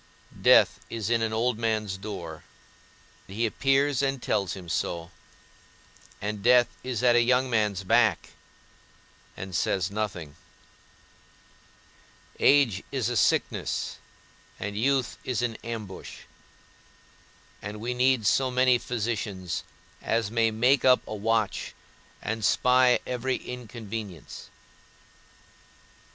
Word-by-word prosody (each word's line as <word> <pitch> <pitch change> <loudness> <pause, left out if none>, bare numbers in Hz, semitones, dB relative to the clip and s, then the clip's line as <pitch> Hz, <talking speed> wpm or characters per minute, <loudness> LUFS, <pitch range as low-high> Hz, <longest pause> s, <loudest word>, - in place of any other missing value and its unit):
Death - - +5
is 115 -1 -3
in 115 -1 +2
an 110 -1 0
old 115 +1 0
man's 110 -3 -1
door, 95 -6 -7 0.8
he 110 +4 -2
appears 135 +3 +2
and 135 -1 0
tells 100 -5 -1
him 90 -2 -9
so, 85 0 -3 1.1
and 105 0 -4
death 120 +2 +5
is 125 -3 -3
at 120 -1 +5
a 120 - +6
young 125 +2 +2
man's 105 -4 +1
back, 95 - +2 1.1
and 95 0 -7
says 95 +2 0
nothing; 95 -8 -4 2.0
age 130 -9 +4
is 130 -4 -1
a 120 - -2
sickness, 105 - 0 0.6
and 100 0 -4
youth 130 +3 0
is 125 -1 -2
an 115 -2 -1
ambush; 110 -5 -7 1.4
and 105 +1 -7
we 120 +3 -2
need 125 -2 +2
so 130 +5 +3
many 125 -1 +3
physicians 110 -7 -3 0.4
as 115 -2 -1
may 115 -1 +2
make 125 +5 +2
up 130 -1 +5
a - - -5
watch, 110 0 -1 0.5
and 110 0 -3
spy 125 +2 +4
every 125 +1 -1
inconvenience. 110 - -8
115 Hz, 110 wpm, -27 LUFS, 105-125 Hz, 2.0 s, a